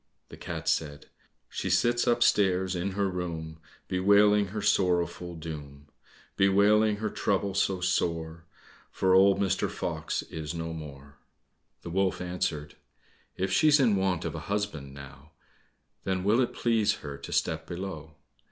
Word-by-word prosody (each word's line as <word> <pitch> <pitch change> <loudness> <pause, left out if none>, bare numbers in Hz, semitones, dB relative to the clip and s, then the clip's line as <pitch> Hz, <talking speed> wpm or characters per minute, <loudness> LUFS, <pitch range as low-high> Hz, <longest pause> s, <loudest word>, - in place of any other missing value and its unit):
The - - -10
cat - - -6
said, 75 -2 -1 0.4
"She - - -4
sits 120 0 +2
upstairs 95 -6 +3
in 95 +2 -2
her 100 0 0
room, 85 -3 -5 0.3
Bewailing 100 +2 +4
her 105 +3 -5
sorrowful 90 -3 +1
doom, 75 -3 -9 0.5
Bewailing 105 +2 +4
her 110 +1 -3
trouble 100 0 -1
so 95 -1 0
sore, 85 -2 -1 0.4
For 95 -1 +1
old 95 +1 +5
Mr. 95 -1 0
Fox - - -3
is 80 +1 -6
no 80 0 -4
more." 70 -2 -10 0.7
The 85 - -7
wolf 95 +1 0
answered, 90 -4 -3 0.6
"If 95 0 -1
she's 155 -1 +5
in 120 -6 +4
want 95 -3 0
of - - -3
a - - -5
husband 90 -10 -3
now, 70 +2 -13 0.7
Then 95 -1 -1
will 110 +6 +3
it 125 - -1
please 115 -3 +2
her 70 - -5
to - - -9
step 80 0 -1
below?" 85 -4 -7
90 Hz, 145 wpm, -28 LUFS, 80-100 Hz, 0.7 s, old